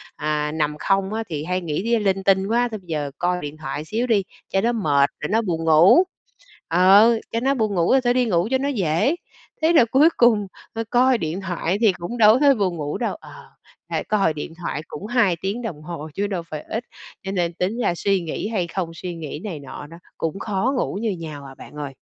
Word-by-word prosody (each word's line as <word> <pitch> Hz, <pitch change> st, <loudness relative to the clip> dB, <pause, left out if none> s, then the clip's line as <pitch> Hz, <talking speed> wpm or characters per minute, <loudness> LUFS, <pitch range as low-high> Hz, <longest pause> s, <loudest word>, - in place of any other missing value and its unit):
à, 150 Hz, 0 st, -1 dB
nằm 150 Hz, -1 st, -1 dB
không 195 Hz, +1 st, +1 dB
á 225 Hz, +1 st, -2 dB
thì 150 Hz, -2 st, -3 dB
hay 180 Hz, +2 st, -2 dB
nghĩ 165 Hz, +1 st, -3 dB
lia 235 Hz, 0 st, +2 dB
linh 195 Hz, -2 st, 0 dB
tinh 190 Hz, 0 st, +3 dB
quá, 240 Hz, +3 st, +2 dB
thôi 215 Hz, -, -5 dB
bây 180 Hz, -, -24 dB
giờ 150 Hz, -3 st, -3 dB
coi 180 Hz, 0 st, 0 dB
điện 145 Hz, +1 st, -7 dB
thoại 150 Hz, 0 st, -5 dB
xíu 230 Hz, +8 st, -2 dB
đi, 215 Hz, -5 st, +2 dB, 0.3 s
cho 195 Hz, -, +1 dB
nó 235 Hz, +3 st, +2 dB
mệt 145 Hz, -11 st, +2 dB
rồi 150 Hz, -, -3 dB
nó 225 Hz, +2 st, +2 dB
buồn 170 Hz, -6 st, -2 dB
ngủ, 165 Hz, -, +6 dB, 0.6 s
ờ, 200 Hz, +7 st, +6 dB
cho 230 Hz, -, 0 dB
nó 270 Hz, +3 st, +1 dB
buồn 215 Hz, -5 st, -1 dB
ngủ, 175 Hz, +7 st, +3 dB
thôi 245 Hz, -, +3 dB
đi 250 Hz, 0 st, +2 dB
ngủ 175 Hz, -5 st, +1 dB
cho 265 Hz, -, +3 dB
nó 275 Hz, +2 st, -2 dB
dễ. 200 Hz, -, +1 dB, 0.5 s
Thế 320 Hz, +2 st, +3 dB
rồi 280 Hz, -8 st, +6 dB
cuối 270 Hz, +8 st, +5 dB
cùng, 220 Hz, -4 st, +4 dB, 0.3 s
ờ, 225 Hz, -, -2 dB
coi 255 Hz, +1 st, +4 dB
điện 165 Hz, -1 st, -3 dB
thoại 180 Hz, 0 st, -2 dB
thì 210 Hz, -5 st, +5 dB
cũng 175 Hz, +8 st, -6 dB
đâu 215 Hz, -2 st, +7 dB
có 245 Hz, -, +2 dB
thấy 280 Hz, -1 st, +5 dB
buồn 185 Hz, -6 st, -1 dB
ngủ 145 Hz, -1 st, -3 dB
đâu. 240 Hz, -, -2 dB
Ờ, -, -, -14 dB, 0.6 s
lại -, -, -2 dB
coi 195 Hz, -7 st, +1 dB
điện 150 Hz, +2 st, -6 dB
thoại 160 Hz, -2 st, -3 dB
cũng 190 Hz, -, -8 dB
2 230 Hz, -7 st, +2 dB
tiếng 200 Hz, +5 st, -2 dB
đồng 180 Hz, -11 st, -6 dB
hồ 160 Hz, -1 st, -7 dB
chứ 205 Hz, +1 st, -1 dB
đâu 185 Hz, -4 st, -3 dB
phải 155 Hz, -2 st, -7 dB
ít, 225 Hz, -, -4 dB, 0.4 s
cho 195 Hz, -, -4 dB
nên 175 Hz, -3 st, -1 dB
tính 185 Hz, +7 st, -2 dB
ra 175 Hz, -, +1 dB
suy 195 Hz, +1 st, +1 dB
nghĩ 165 Hz, +4 st, -4 dB
hay 200 Hz, -6 st, -1 dB
không, 175 Hz, 0 st, -3 dB
suy 175 Hz, +1 st, -6 dB
nghĩ 155 Hz, -2 st, -6 dB
này 175 Hz, -8 st, -5 dB
nọ 140 Hz, +1 st, -9 dB
đó, 165 Hz, -, -12 dB, 0.2 s
cũng 165 Hz, +4 st, -3 dB
khó 210 Hz, +6 st, -1 dB
ngủ 195 Hz, -, -1 dB
như 225 Hz, -2 st, 0 dB
nhau 155 Hz, -6 st, -7 dB
à 135 Hz, 0 st, -11 dB
bạn -, -, -13 dB
ơi. 145 Hz, -2 st, -5 dB
190 Hz, 240 wpm, -22 LUFS, 160-225 Hz, 0.6 s, đâu